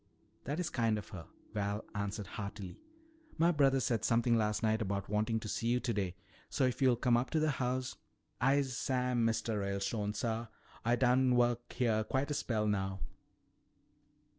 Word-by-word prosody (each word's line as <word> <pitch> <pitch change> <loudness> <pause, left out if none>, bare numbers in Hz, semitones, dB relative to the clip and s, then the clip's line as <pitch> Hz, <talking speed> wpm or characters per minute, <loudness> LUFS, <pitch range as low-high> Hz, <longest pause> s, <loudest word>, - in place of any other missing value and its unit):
"That 145 +6 -2
is 165 -3 -2
kind 115 -3 +1
of 105 - -7
her," 85 -4 -8 0.3
Val 100 0 -2
answered 105 0 -3
heartily. 100 -1 -7 0.6
"My 170 +2 +4
brother 135 -4 +4
said 115 -2 0
something 115 0 +3
last 105 0 +1
night 110 +1 +2
about 100 -2 -2
wanting 110 +2 +1
to 110 - -6
see 115 - -2
you 120 +1 +3
today, 100 -8 -1 0.3
so 140 - 0
if 125 +2 -1
you'll 130 -2 +5
come 120 0 +2
up 120 +2 +1
to 160 - +1
the 155 0 +2
house 130 -1 -2 0.2
" - - -35
"I'se 140 -2 +1
Sam, 125 0 0
Mistuh 115 -1 0
Ralestone, 100 +2 -2
suh. 115 +1 -2 0.4
Ah 120 +1 +3
done 125 0 +3
work 120 0 +1
heah 110 -4 +1
quite 135 +6 -1
a - - +1
spell 110 -6 0
now." 95 -2 -1
115 Hz, 175 wpm, -34 LUFS, 105-125 Hz, 0.6 s, you'll